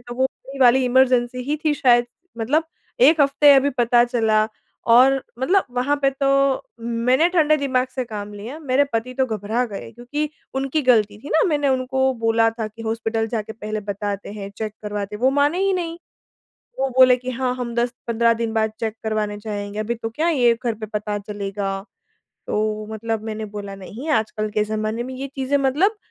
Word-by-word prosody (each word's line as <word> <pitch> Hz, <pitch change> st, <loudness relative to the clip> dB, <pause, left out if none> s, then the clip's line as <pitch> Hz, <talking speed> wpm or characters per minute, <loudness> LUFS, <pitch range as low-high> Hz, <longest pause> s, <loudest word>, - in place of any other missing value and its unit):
तो 240 Hz, 0 st, -9 dB
वो 260 Hz, +1 st, +1 dB
वही 270 Hz, +1 st, -6 dB
वाली 255 Hz, +1 st, +6 dB
इमरजेंसी 250 Hz, -1 st, +2 dB
ही 295 Hz, +3 st, -1 dB
थी 300 Hz, -1 st, +3 dB
शायद। 245 Hz, -4 st, +4 dB, 0.3 s
मतलब 295 Hz, +9 st, +1 dB, 0.4 s
1 300 Hz, +5 st, +6 dB
हफ़्ते 285 Hz, +1 st, +6 dB
अभी 275 Hz, +1 st, +4 dB
पता 240 Hz, 0 st, +4 dB
चला 220 Hz, -3 st, +2 dB, 0.5 s
और 265 Hz, +2 st, +5 dB, 0.2 s
मतलब 370 Hz, +9 st, +2 dB
वहाँ 255 Hz, +4 st, 0 dB
पे 275 Hz, -, +5 dB
तो 275 Hz, +1 st, -2 dB, 0.5 s
मैंने 235 Hz, +7 st, +2 dB
ठंडे 310 Hz, -4 st, +4 dB
दिमाग 260 Hz, -3 st, 0 dB
से 255 Hz, -, -1 dB
काम 210 Hz, -3 st, -7 dB
लिया, 230 Hz, +9 st, -7 dB
मेरे 280 Hz, -1 st, +2 dB
पति 230 Hz, +3 st, -2 dB
तो 260 Hz, -, +3 dB
घबरा 220 Hz, +2 st, -1 dB
गए 205 Hz, +1 st, -8 dB
क्योंकि 245 Hz, +6 st, -3 dB, 0.3 s
उनकी 275 Hz, +3 st, -1 dB
ग़लती 210 Hz, -3 st, +3 dB
थी 275 Hz, -, -10 dB
ना 320 Hz, -, +4 dB
मैंने 290 Hz, -3 st, +1 dB
उनको 265 Hz, 0 st, +1 dB
बोला 225 Hz, -1 st, +2 dB
था 225 Hz, -1 st, -4 dB
कि 225 Hz, +2 st, -12 dB
हॉस्पिटल 225 Hz, 0 st, -1 dB
जाके 220 Hz, -1 st, -3 dB
पहले 215 Hz, -1 st, -5 dB
बताते 200 Hz, 0 st, -4 dB
हैं, 200 Hz, -1 st, -7 dB
चेक 215 Hz, -1 st, -3 dB
करवाते 210 Hz, 0 st, -4 dB
हैं, 230 Hz, -, -13 dB
वो 260 Hz, -, +5 dB
माने 290 Hz, +5 st, +2 dB
ही 390 Hz, -, +2 dB
नहीं। 340 Hz, -2 st, -3 dB, 0.8 s
वो 270 Hz, 0 st, +1 dB
बोले 255 Hz, -1 st, +7 dB
कि 255 Hz, +1 st, -5 dB
हाँ, 255 Hz, 0 st, -1 dB
हम 245 Hz, -2 st, -4 dB
10-15 235 Hz, -1 st, +1 dB
दिन 230 Hz, -1 st, -3 dB
बाद 220 Hz, -1 st, +1 dB
चेक 220 Hz, -1 st, -2 dB
करवाने 215 Hz, -1 st, -1 dB
जाएँगे। 205 Hz, -1 st, -5 dB
अभी 220 Hz, +2 st, -2 dB
तो 225 Hz, -1 st, -5 dB
क्या 310 Hz, +9 st, 0 dB
ये 245 Hz, -7 st, +4 dB
घर 235 Hz, -, 0 dB
पे 215 Hz, 0 st, -6 dB
पता 210 Hz, -1 st, -3 dB
चलेगा। 195 Hz, -1 st, -4 dB, 0.6 s
तो 215 Hz, 0 st, -1 dB
मतलब 225 Hz, 0 st, -3 dB
मैंने 220 Hz, 0 st, -4 dB
बोला 200 Hz, -1 st, -6 dB
नहीं 215 Hz, +10 st, -8 dB
आजकल 215 Hz, -3 st, 0 dB
के 210 Hz, -, +4 dB
ज़माने 215 Hz, +2 st, -2 dB
में 260 Hz, +1 st, -7 dB
ये 270 Hz, +2 st, -5 dB
चीज़ें 270 Hz, +1 st, +1 dB
मतलब 300 Hz, +11 st, +2 dB
240 Hz, 190 wpm, -22 LUFS, 215-265 Hz, 0.8 s, बोले